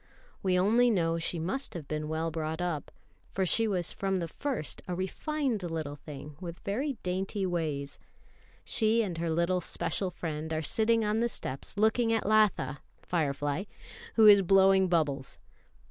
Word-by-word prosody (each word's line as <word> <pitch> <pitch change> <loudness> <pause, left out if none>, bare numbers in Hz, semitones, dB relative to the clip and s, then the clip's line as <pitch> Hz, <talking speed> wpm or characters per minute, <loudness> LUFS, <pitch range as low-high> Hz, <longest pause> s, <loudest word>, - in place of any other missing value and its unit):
We 185 -1 +2
only 230 +7 +4
know 165 -6 +1
she 170 +1 -1
must 185 +12 -3
have 155 -5 -6
been 150 0 -3
well 160 +1 -2
brought 160 0 -3
up, 175 -4 -2 0.4
for 190 - -1
she 225 +5 +3
was 180 -5 -1
from 195 -1 -1
the 175 -3 -1
first 260 - -3
a 180 - -2
refined 250 - -2
little 160 -4 -4
thing 145 0 -10
with 170 -1 -6
very 265 +9 -1
dainty 190 +2 -2
ways. 155 -6 -3 0.6
She 225 +1 +2
and 175 -5 -4
her 170 0 -1
little 170 +3 +1
special 190 +2 -1
friend 160 -2 -5
are 155 0 -1
sitting 225 +6 +2
on 210 +1 +1
the 235 +1 +1
steps 135 - -6
looking 220 +2 +3
at 225 -1 +1
Latha 210 -9 +2 0.2
(Firefly), 145 0 -1 0.5
who 225 - +6
is 205 -1 +9
blowing 190 0 +5
bubbles. 150 -6 0
180 Hz, 160 wpm, -30 LUFS, 160-210 Hz, 0.6 s, is